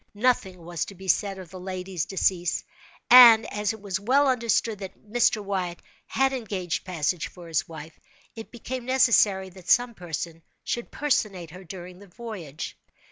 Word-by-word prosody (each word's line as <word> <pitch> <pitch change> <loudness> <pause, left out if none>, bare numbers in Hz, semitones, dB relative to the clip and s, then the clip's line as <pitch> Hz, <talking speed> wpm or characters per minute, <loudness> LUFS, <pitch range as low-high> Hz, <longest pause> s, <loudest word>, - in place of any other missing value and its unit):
Nothing 200 -7 0
was 170 -2 -3
to 200 - -11
be 190 +1 -11
said 195 +1 +1
of 185 -3 -10
the 185 - -9
lady's 185 -2 -4
decease; 180 -3 0 0.5
and, 235 -3 +10
as 210 0 0
it 220 - -8
was 195 -2 -3
well 265 +8 +3
understood 230 -4 +1
that 190 -2 -8
Mr. 215 -1 +1
Wyatt 185 -3 -3 0.3
had 270 0 +1
engaged 195 -9 -3
passage 170 -2 -1
for 175 -2 -13
his 165 -1 -1
wife, 160 0 -10 0.4
it 225 -1 -9
became 245 +1 -6
necessary 215 -7 +3
that 185 -1 -13
some 245 0 +4
person 165 -3 -6 0.2
should 240 - -3
personate 200 - -1
her 185 +2 -11
during 180 0 -10
the 200 - -14
voyage. 175 -8 -7
190 Hz, 165 wpm, -26 LUFS, 175-230 Hz, 0.5 s, and